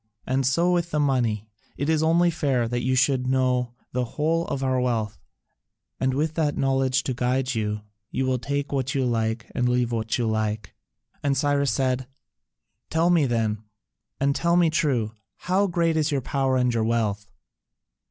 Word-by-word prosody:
And 130 0 +1
so 170 +7 +2
with 175 -1 +1
the 150 - -1
money: 120 -7 +1 0.3
it 140 - -2
is 160 -1 +2
only 170 +2 +3
fair 135 -7 0
that 120 +1 -2
you 130 +2 +1
should 130 0 +2
know 125 -2 +1 0.2
the 125 0 0
whole 165 +2 +1
of 135 - -3
our 130 -1 +1
wealth, 115 -4 -1 0.8
and 130 0 +1
with 155 +3 0
that 150 -2 0
knowledge 135 -1 +1
to 130 - -2
guide 125 +2 0
you, 105 -2 -2 0.3
you 130 - -1
will 130 -1 0
take 140 +3 -3
what 135 0 -1
you 135 -2 +1
like 110 -2 -1
and 125 0 +1
leave 125 -1 +1
what 115 -1 -1
you 120 - 0
like." 110 -1 -2 0.5
And 140 -1 +1
Cyrus 140 0 +2
said, 130 -1 0 0.8
"Tell 165 +2 +2
me 160 -5 +4
then, 110 -3 0 0.6
and 140 0 +1
tell 170 0 +2
me 170 -2 +4
true: 130 -9 +1 0.3
how 190 +3 +1
great 170 -2 +1
is 155 0 +1
your 140 - +1
power 135 0 0
and 125 -1 +2
your 115 -1 +1
wealth?" 105 -3 -1
130 Hz, 180 wpm, -25 LUFS, 120-145 Hz, 0.8 s, me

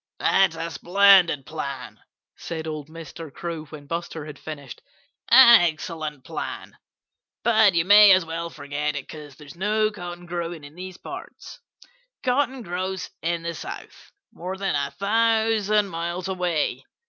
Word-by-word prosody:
"That's 190 -4 +3
a 165 +1 -4
splendid 180 -6 +4
plan," 140 -4 -6 0.4
said 160 -2 -6
old 155 -2 -5
Mr. 165 -1 -9
Crow 165 +1 -6
when 150 -1 -11
Buster 165 0 -5
had 150 -2 -10
finished. 145 -5 -9 0.5
"An 235 -3 +9
excellent 155 -4 -3
plan 160 +1 -6 0.7
but 220 -5 +4
you 165 0 +2
may 205 +1 +8
as 185 -2 +5
well 165 +1 -4
forget 145 0 -4
it, 135 - -5
because 150 -3 -10
there's 150 +2 -13
no 215 +3 +1
cotton 175 -3 -8
growing 170 -2 -5
in 145 +1 -12
these 185 +1 -9
parts. - - -10 0.6
Cotton 260 0 0
grows 185 0 -4
in 170 0 -2
the 170 0 -3
South, - - -9 0.2
more 185 -1 -6
than 195 0 -1
a 140 -1 -1
thousand 220 0 +1
miles 170 +1 -4
away. 180 -5 -1
170 Hz, 145 wpm, -24 LUFS, 155-195 Hz, 0.7 s, An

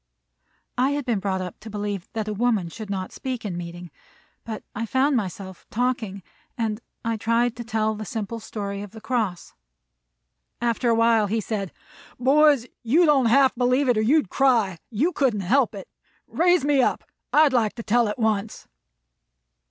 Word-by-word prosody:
I 265 +3 +3
had 290 -2 -2
been 235 -5 0
brought 190 -1 -1
up 180 -2 -7
to 220 - -10
believe 205 -3 -4
that 220 -2 -3
a 215 - -2
woman 215 -5 +1
should 215 +4 -8
not 190 -2 -3
speak 255 -4 -5
in 190 -4 -3
meeting, 175 0 -7 0.5
but 220 -2 -6
I 230 +2 -3
found 265 +4 +2
myself 190 -3 -4
talking, 225 -5 -2 0.3
and 225 -1 -2 0.2
I 230 -1 0
tried 230 +2 +1
to 240 - -5
tell 220 -1 0
the 215 0 -6
simple 220 +2 -4
story 200 -2 -5
of 205 0 -9
the 220 - -9
cross. 220 -6 -2 1.1
After 235 +1 0
a 230 - +4
while 230 -2 +3
he 220 +3 0
said: 205 -3 -3 0.5
"Boys, 280 0 +4 0.2
you 290 +10 +4
don't 275 -5 +4
half 265 +3 +5
believe 250 +3 +2
it, 245 -3 +3
or - - +2
you'd 255 - +2
cry; 230 -10 +2
you 265 - +1
couldn't 250 - +1
help 230 +4 +2
it. 195 - -8 0.4
Raise 350 -3 +2
me 285 -2 +4
up. - - 0 0.3
I'd 300 -2 +5
like 225 -4 +2
to 230 - -6
tell 235 +1 +2
it 210 - -3
once." 220 -2 -1
225 Hz, 175 wpm, -24 LUFS, 205-255 Hz, 1.1 s, half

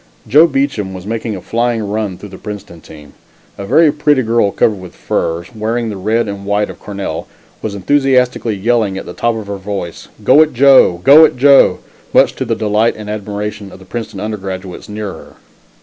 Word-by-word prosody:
Joe 150 +9 +6
Beacham 135 - -2
was 90 0 -9
making 110 0 -3
a 95 - -7
flying 115 -1 -1
run 105 -3 -3
through 105 - -10
the 95 - -11
Princeton 100 -6 -9
team. 75 -2 -14 0.5
A 100 - -6
very 160 +6 +4
pretty 150 -3 +1
girl 115 -2 +2
covered 105 0 0
with 90 -1 -11
furs, 85 +1 -3
wearing 115 +1 -2
the 105 - -5
red 110 +4 0
and 100 -1 -6
white 105 +1 -1
of - - -14
Cornell, 100 -1 -5 0.3
was 105 -2 -4
enthusiastically 125 0 +1
yelling 105 -1 0
at - - -6
the 90 - -8
top 120 +3 -1
of 110 -2 -6
her 100 0 -5
voice 95 -3 -6 0.2
"Go 130 +8 +6
it, 155 -1 +2
Joe! 130 -9 +5
go 150 +4 +8
it, 155 - +3
Joe!" 140 +1 +5 0.3
much - - +5
to 130 - -2
the 115 -1 -1
delight 110 +1 +1
and 105 -1 -7
admiration 105 -1 -5
of - - -12
the 95 - -16
Princeton 115 +4 -6
undergraduates 95 -4 -6
near 105 -1 -5
her. 80 - -14
105 Hz, 195 wpm, -15 LUFS, 100-120 Hz, 0.5 s, go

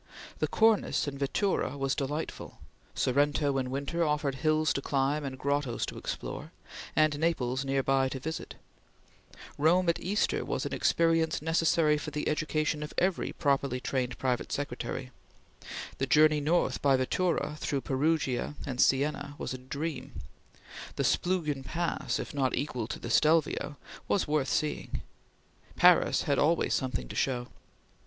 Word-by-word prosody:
The - - +1
Cornice 220 -8 +2
in 140 - -3
vettura 145 +3 0
was 135 0 0
delightful; 145 +3 -4 0.4
Sorrento 145 +1 +2
in 130 -1 -2
winter 140 +6 -1
offered 150 -2 0
hills 155 +3 +1
to 140 - -2
climb 140 +2 0
and 135 -1 -5
grottoes 140 -3 -1
to - - -7
explore, - - -5 0.4
and 155 -1 +3
Naples 135 -5 0
near 135 0 0
by 135 0 +2
to 130 - -5
visit; 160 +4 -5 1.0
Rome 175 +4 +4
at 170 - +1
Easter 205 +3 0
was - - -2
an - - -3
experience 165 -1 +2
necessary 160 -1 +2
for 155 - -5
the 150 0 -3
education 155 0 0
of 150 - -6
every 185 -1 +1
properly 140 -3 0
trained 125 -1 -2
private 125 -2 -1
secretary; 130 -2 -4 0.9
the 135 - 0
journey 150 +1 +5
north 160 +4 +1
by 135 -2 +4
vettura 150 +2 0
through 140 -3 -1
Perugia 140 +1 0
and 130 -3 -1
Sienna 145 +1 +1
was - - -4
a 130 - -6
dream; 145 +5 -5 0.8
the - - -1
Splugen 155 -7 0
Pass, 170 +5 -2
if - - -5
not 135 -3 +1
equal 125 -4 -2
to - - -4
the 115 - -6
Stelvio, 155 0 +2 0.3
was 200 - +1
worth 150 -2 +1
seeing; 150 - -2 0.7
Paris - - +5
had 140 - +1
always 165 +3 +2
something 125 - -1
to - - -8
show. 125 -2 -1
145 Hz, 150 wpm, -29 LUFS, 135-155 Hz, 1.0 s, journey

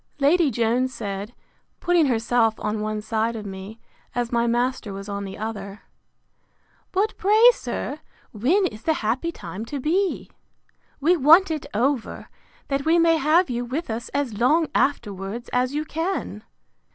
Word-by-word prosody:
Lady 305 +3 +4
Jones 240 +2 +1
said, 205 0 -5 0.4
putting 345 -4 +3
herself 230 -2 +2
on 210 +1 -2
one 215 0 -2
side 220 +1 -1
of 215 -2 -6
me, 195 +3 -8 0.4
as 240 -1 -1
my 235 0 +1
master 240 -3 -1
was 195 +1 -7
on 200 -1 -4
the 190 - -7
other, 205 -2 -6 1.1
But 405 +3 0
pray, 435 +5 +6
sir, 270 - -5 0.3
when 300 - +2
is 215 -9 -4
the 320 +4 +1
happy 260 +10 0
time 215 - -7
to 280 +4 -5
be? 360 +8 -1 0.7
We 330 +6 +4
want 325 +6 +6
it 310 -3 -3
over, 250 +2 -1 0.4
that 275 0 -1
we 325 +3 +3
may 330 -1 +4
have 310 +1 +3
you 240 0 -2
with 260 +3 -4
us 225 +1 -4
as 270 -7 -2
long 305 +6 +3
afterwards 210 -3 -1
as 250 +2 +1
you 305 +1 -1
can. 325 - -3
245 Hz, 155 wpm, -23 LUFS, 220-315 Hz, 1.1 s, pray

